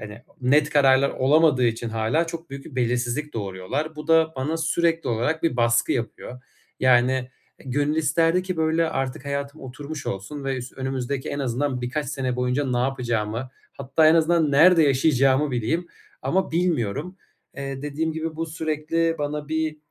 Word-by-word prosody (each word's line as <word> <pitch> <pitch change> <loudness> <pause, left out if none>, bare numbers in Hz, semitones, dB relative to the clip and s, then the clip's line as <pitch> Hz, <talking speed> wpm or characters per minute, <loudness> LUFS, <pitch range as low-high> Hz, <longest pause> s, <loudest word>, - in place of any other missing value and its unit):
hani, 105 +2 -9 0.2
net 145 +4 +3
kararlar 135 -1 +4
olamadığı 140 -1 +3
için 115 0 -2
hâlâ 115 +9 0
çok 165 -2 -7
büyük 135 0 -8
bir 145 - -12
belirsizlik 125 +4 -1
doğuruyorlar. 110 +10 -4
Bu 150 +1 -8
da 160 0 +4
bana 145 +5 -1
sürekli 165 0 0
olarak 120 +8 -1
bir 165 -7 +1
baskı 115 -1 +2
yapıyor. 125 +1 -5 0.4
Yani, 125 0 +4
eee, 130 +1 -7
gönül 145 +4 0
isterdi 165 +4 +2
ki, 185 -1 -4
böyle, 160 +1 +1
artık 135 0 -3
hayatım 140 +1 -4
oturmuş 140 +4 -8
olsun 135 +9 -5
ve 135 -1 -1
üs 125 0 -7
önümüzdeki 130 0 -3
en 140 - -3
azından 130 0 -1
birkaç 130 +5 -3
sene 130 -2 -2
boyunca 125 +3 0
ne 125 - +1
yapacağımı 120 -2 -2 0.2
hatta 140 +3 +2
en 155 - +6
azından 165 -1 +3
nerede 165 +4 +6
yaşayacağımı 135 0 +3
bileyim 125 +9 -1 0.4
ama 190 +1 0
bilmiyorum. 165 - -1 0.4
Eee, 135 -1 -5
dediğim 150 +2 -2
gibi 160 0 -4
bu 165 +1 -2
sürekli 160 +1 -1
bana 145 0 -3
bir 160 -1 -1
140 Hz, 165 wpm, -24 LUFS, 125-160 Hz, 0.4 s, en